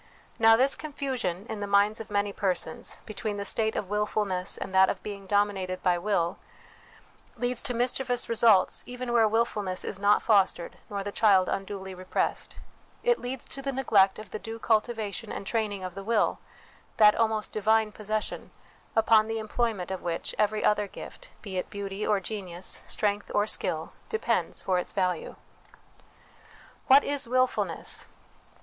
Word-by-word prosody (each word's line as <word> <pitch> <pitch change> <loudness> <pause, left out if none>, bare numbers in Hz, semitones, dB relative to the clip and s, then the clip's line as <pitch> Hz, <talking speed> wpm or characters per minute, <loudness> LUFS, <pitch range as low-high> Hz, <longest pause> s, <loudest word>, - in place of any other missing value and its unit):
Now, 225 0 +7
this 265 +4 +3
confusion, 260 - -3
in 215 - -5
the 205 - -3
minds 200 +2 +3
of 225 - -8
many 205 -1 0
persons, 180 -5 -2
between 215 -1 -4
the 200 - -4
state 220 +1 +1
of 195 - -2
wilfulness 205 -2 -1
and 190 - -6
that 190 0 +6
of - - -3
being 200 -2 -7
dominated 195 -2 0
by 180 -2 +3
will, 175 -3 0 1.0
leads 245 0 0
to 245 - -3
mischievous 245 +1 0
results 225 -4 +4
even 250 -1 -4
where 225 -2 +5
wilfulness 210 -4 0
is 195 - -3
not 205 +1 +4
fostered 195 -5 +2
nor 200 -2 -3
the 205 - -4
child 195 -4 +4
unduly 195 -1 -4
repressed: 185 0 -2 0.5
it 485 0 +3
leads 250 0 -5
to 275 - -5
the 275 0 -2
neglect 210 -8 +3
of 215 -3 -10
the 215 - -4
due 225 +1 -7
cultivation 220 -1 -1
and - - -5
training 210 -3 -1
of 185 -1 -5
the 195 +1 -7
will, 220 0 +1 0.6
that 210 -1 +7
almost 220 -2 0
divine 220 +1 +2
possession, 215 0 -4 0.5
upon 220 -1 +5
the 225 0 -2
employment 220 -4 -2
of 190 - -4
which 170 -1 -2
every 215 0 +1
other 210 -1 +2
gift, - - -11
be 195 -4 -5
it - - -5
beauty 200 0 -4
or 210 -2 +3
genius, 185 -3 -3
strength 205 -1 -1
or 205 - +3
skill, - - -3 0.2
depends 445 - 0
for 185 -1 +1
its - - -4
value. 180 -4 -1 1.5
What 275 +2 +7
is 285 -3 -1
Wilfulness 255 +1 0
210 Hz, 160 wpm, -28 LUFS, 195-225 Hz, 1.5 s, Now